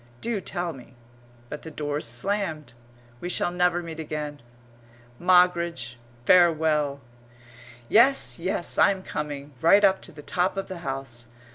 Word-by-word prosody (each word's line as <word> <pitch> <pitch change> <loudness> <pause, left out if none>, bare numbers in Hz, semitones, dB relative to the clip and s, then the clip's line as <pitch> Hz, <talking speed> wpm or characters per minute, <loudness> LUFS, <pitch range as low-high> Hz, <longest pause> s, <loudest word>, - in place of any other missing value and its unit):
Do 230 - -2
tell 175 -1 -3
me 125 -1 -14 0.5
but 150 - -7
the 160 - -8
doors 150 -2 -3
slammed. 155 - -2 0.5
We 175 - -5
shall 175 - 0
never 180 0 +1
meet 165 -1 -8
again. 150 -2 -5 0.8
Moggridge, 170 -9 +2 0.3
farewell! 155 -5 +4 0.9
Yes, 250 - +4
yes, 175 0 -2
I'm 195 -2 +4
coming. 145 -3 -5
Right 200 +6 +6
up 195 -1 +4
to - - -8
the 150 -2 -12
top 180 +5 0
of 195 - -4
the 185 -2 -6
house. 135 -6 -5
165 Hz, 135 wpm, -25 LUFS, 145-180 Hz, 0.9 s, Right